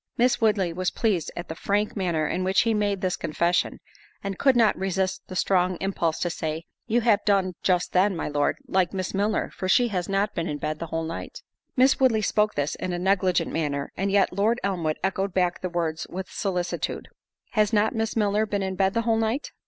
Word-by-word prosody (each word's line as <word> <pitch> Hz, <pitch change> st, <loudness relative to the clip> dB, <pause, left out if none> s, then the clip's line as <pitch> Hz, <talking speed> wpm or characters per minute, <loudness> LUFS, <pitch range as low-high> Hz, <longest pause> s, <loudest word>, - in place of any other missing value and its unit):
Miss 245 Hz, +1 st, +2 dB
Woodley 200 Hz, -6 st, +2 dB
was 185 Hz, +1 st, -1 dB
pleased 205 Hz, -8 st, 0 dB
at 175 Hz, -, -5 dB
the -, -, -4 dB
frank 205 Hz, +5 st, -1 dB
manner 170 Hz, -6 st, 0 dB
in 185 Hz, -, -1 dB
which 190 Hz, +1 st, +3 dB
he 230 Hz, -1 st, +1 dB
made 205 Hz, -2 st, 0 dB
this 185 Hz, -2 st, 0 dB
confession, 170 Hz, +3 st, 0 dB, 0.4 s
and 195 Hz, -2 st, -4 dB
could 270 Hz, -2 st, +4 dB
not 225 Hz, -3 st, +4 dB
resist 190 Hz, 0 st, -1 dB
the 185 Hz, -, -8 dB
strong 185 Hz, -1 st, +2 dB
impulse 175 Hz, -4 st, -1 dB
to 175 Hz, -, 0 dB
say, 160 Hz, 0 st, -4 dB, 0.2 s
"You 235 Hz, +1 st, +2 dB
have 220 Hz, -3 st, +3 dB
done 195 Hz, -3 st, +2 dB
just 180 Hz, -2 st, +1 dB
then, 190 Hz, +1 st, +3 dB
my 165 Hz, -, -3 dB
Lord, 145 Hz, -1 st, 0 dB
like 185 Hz, 0 st, +1 dB
Miss 185 Hz, -1 st, -3 dB
Milner, 205 Hz, +2 st, 0 dB
for 185 Hz, -, -4 dB
she 240 Hz, +4 st, +4 dB
has 180 Hz, -3 st, -2 dB
not 195 Hz, +2 st, 0 dB
been 170 Hz, -1 st, -2 dB
in 145 Hz, -, -3 dB
bed 155 Hz, +1 st, -3 dB
the 170 Hz, -, -4 dB
whole 165 Hz, +1 st, -2 dB
night." 165 Hz, +1 st, -7 dB, 0.3 s
Miss 260 Hz, +1 st, +5 dB
Woodley 235 Hz, -5 st, +3 dB
spoke 210 Hz, +1 st, +1 dB
this 145 Hz, +1 st, -1 dB
in 185 Hz, -1 st, -4 dB
a -, -, -1 dB
negligent 185 Hz, -2 st, +1 dB
manner, 145 Hz, -3 st, -2 dB
and 195 Hz, +1 st, -1 dB
yet, 200 Hz, 0 st, +3 dB
Lord 220 Hz, +4 st, +1 dB
Elmwood 170 Hz, -6 st, -1 dB
echoed 195 Hz, 0 st, -1 dB
back 180 Hz, -2 st, +1 dB
the 185 Hz, -, -2 dB
words 165 Hz, -2 st, -2 dB
with 185 Hz, +1 st, -6 dB
solicitude, 180 Hz, -3 st, -2 dB, 0.4 s
"Has 215 Hz, -2 st, +2 dB
not 215 Hz, 0 st, +2 dB
Miss 225 Hz, 0 st, -2 dB
Milner 210 Hz, 0 st, +1 dB
been 200 Hz, -1 st, -1 dB
in 190 Hz, 0 st, -2 dB
bed 190 Hz, +1 st, +1 dB
the 230 Hz, -, +2 dB
whole 225 Hz, -1 st, +2 dB
night?" 225 Hz, +5 st, -1 dB
190 Hz, 215 wpm, -25 LUFS, 175-210 Hz, 0.4 s, Miss